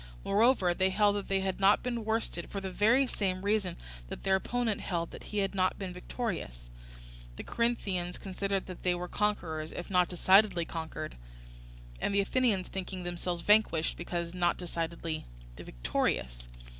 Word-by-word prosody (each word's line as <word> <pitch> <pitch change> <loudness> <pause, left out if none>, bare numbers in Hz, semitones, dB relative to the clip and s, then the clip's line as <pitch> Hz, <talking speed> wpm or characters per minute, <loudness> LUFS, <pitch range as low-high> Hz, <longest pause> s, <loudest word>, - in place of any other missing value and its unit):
Moreover 205 -3 +4
they 190 +2 +2
held 205 +1 +3
that 200 - -4
they 195 0 +1
had 190 -1 -2
not 195 +1 +5
been 240 -2 -2
worsted, 220 -6 -1
for 200 - -3
the 190 -1 -5
very 230 +8 +4
same 190 -5 -2
reason 200 -4 +1 0.3
that - - -7
their 195 -1 +3
opponent 230 +2 -1
held 170 -2 -2
that - - -10
he 210 - -5
had 195 -1 +1
not 185 -1 +1
been 190 -2 -5
victorious; 170 - -5 0.6
the - - -7
Corinthians 195 -7 -1
considering 195 0 -2
that 185 - -9
they 180 -1 +2
were 175 0 -4
conquerors, 165 -7 -1
if 175 - -7
not 180 -1 +4
decidedly 185 0 +4
conquered, 160 - -5 0.8
and 200 - 0
the 200 - +5
Athenians 210 -3 +1
thinking 185 -1 -5
themselves 175 0 -3
vanquished, 205 -6 +3
because 170 0 -4
not 175 -1 +1
decidedly 165 - -4 0.3
victorious. - - -2
185 Hz, 160 wpm, -31 LUFS, 175-205 Hz, 0.8 s, not